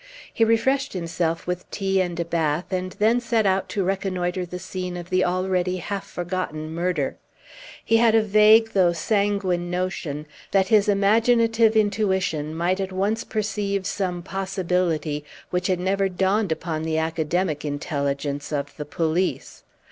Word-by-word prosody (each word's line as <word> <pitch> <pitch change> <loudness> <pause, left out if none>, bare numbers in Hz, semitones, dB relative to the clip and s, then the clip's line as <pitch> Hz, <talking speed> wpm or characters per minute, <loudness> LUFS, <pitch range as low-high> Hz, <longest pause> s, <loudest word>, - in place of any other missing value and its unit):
He 230 - +2
refreshed 265 +5 +2
himself 165 -2 -2
with 180 0 -4
tea 195 -1 0
and 175 -2 -3
a 170 - 0
bath, 165 +1 -1
and 185 0 -2
then 225 +3 +3
set 230 -2 +1
out 190 0 +1
to 200 - -1
reconnoitre 185 -1 -1
the 180 - -6
scene 180 -1 -5
of 175 0 -9
the 185 0 +3
already 185 0 0
half 195 +3 -5
forgotten 175 -3 -4
murder. 170 -4 -1 0.7
He 225 - +4
had 225 -1 +4
a 220 - +5
vague 215 +2 +5
though 180 -3 +3
sanguine 190 -1 0
notion 180 -5 -3 0.2
that 190 -1 +2
his 210 -2 +4
imaginative 225 +2 +3
intuition 190 -7 +1
might 175 +3 0
at 190 -1 -2
once 200 +4 0
perceive 205 -2 -2
some 180 -3 -2
possibility 180 -5 -1 0.3
which 180 0 0
had 185 -2 +1
never 195 +1 +1
dawned 190 +1 +1
upon 160 0 -2
the 160 0 -1
academic 160 0 -1
intelligence 145 -1 -3
of 145 -1 -3
the 150 - -5
police. 165 +4 -1
185 Hz, 150 wpm, -24 LUFS, 170-200 Hz, 0.7 s, a